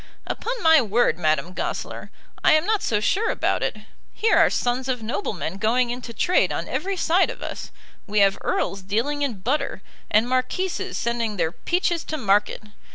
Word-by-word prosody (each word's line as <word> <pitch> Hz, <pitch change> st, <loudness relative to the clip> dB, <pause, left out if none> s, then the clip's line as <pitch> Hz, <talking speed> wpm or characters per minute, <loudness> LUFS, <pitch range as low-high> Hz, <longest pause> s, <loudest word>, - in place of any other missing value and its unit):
"Upon 485 Hz, -2 st, -4 dB
my 320 Hz, -2 st, +7 dB
word, 220 Hz, -6 st, +1 dB
Madame 155 Hz, +1 st, 0 dB
Goesler, -, -, -4 dB, 0.3 s
I -, -, +6 dB
am 310 Hz, +1 st, +3 dB
not 430 Hz, 0 st, +1 dB
so 215 Hz, -, +1 dB
sure 390 Hz, -, +1 dB
about -, -, 0 dB
it. -, -, -1 dB, 0.4 s
Here 445 Hz, +1 st, +2 dB
are -, -, +6 dB
sons 250 Hz, +2 st, -1 dB
of 250 Hz, -3 st, -2 dB
noblemen 210 Hz, -, -3 dB
going 235 Hz, +4 st, +1 dB
into 245 Hz, -1 st, -6 dB
trade 360 Hz, +10 st, +2 dB
on -, -, -3 dB
every 385 Hz, +4 st, -2 dB
side 350 Hz, +2 st, +3 dB
of -, -, -7 dB
us. -, -, -6 dB, 0.4 s
We 210 Hz, 0 st, -3 dB
have 195 Hz, -1 st, +3 dB
earls 195 Hz, -, -1 dB
dealing 230 Hz, +10 st, -1 dB
in 240 Hz, -9 st, -2 dB
butter, 270 Hz, -2 st, -1 dB, 0.3 s
and 215 Hz, +3 st, +3 dB
marquises 255 Hz, +9 st, -1 dB
sending 230 Hz, -3 st, -1 dB
their 160 Hz, -, 0 dB
peaches 345 Hz, -, -1 dB
to 310 Hz, -, -3 dB
market. 210 Hz, -4 st, +1 dB
245 Hz, 175 wpm, -23 LUFS, 210-320 Hz, 0.4 s, my